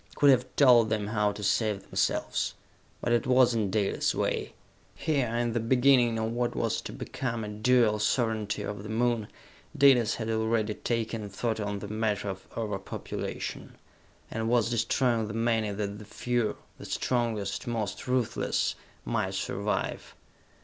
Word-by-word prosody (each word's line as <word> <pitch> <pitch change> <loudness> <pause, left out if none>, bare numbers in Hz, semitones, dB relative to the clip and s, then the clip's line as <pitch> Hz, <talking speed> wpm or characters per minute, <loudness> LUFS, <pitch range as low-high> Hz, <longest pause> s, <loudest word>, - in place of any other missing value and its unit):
Could 145 -1 +6
have 130 -1 +3
told 120 -5 +6
them 105 -1 0
how 105 -1 +1
to 105 0 -8
save 105 -1 +1
themselves! - - -1 0.5
But 120 - +1
it 120 +1 +1
was 125 -2 +5
not 105 -3 0
Dalis' 100 0 0
way. - - -1 0.4
Here, 145 -6 0
in 120 -1 0
the 120 - +1
beginning 125 0 +4
of 110 0 -1
what 120 0 -1
was - - 0
to - - -7
become 115 -3 -4
a - - -4
dual 110 0 +3
sovereignty 110 -2 0
of 105 -1 -5
the 105 - -8
Moon, 115 -1 +1 0.5
Dalis 125 -5 +5
had 110 - -4
already 110 -1 0
taken 115 -2 -2
thought 110 +3 -2
on 105 -1 -2
the 105 - -6
matter 105 -1 -1
of 95 0 -7
over 105 -3 -2
population, 95 - -6 0.6
and 110 0 -2
was 120 -1 +2
destroying 115 0 +1
the 105 - -6
many 115 -2 +1
that 100 0 -4
the 105 - -10
few 120 +1 -1 0.2
the - - -9
strongest, 115 -6 -1
most 110 -4 -3
ruthless 125 -2 0 0.3
might - - -1
survive! - - -2
115 Hz, 155 wpm, -28 LUFS, 105-120 Hz, 0.6 s, Could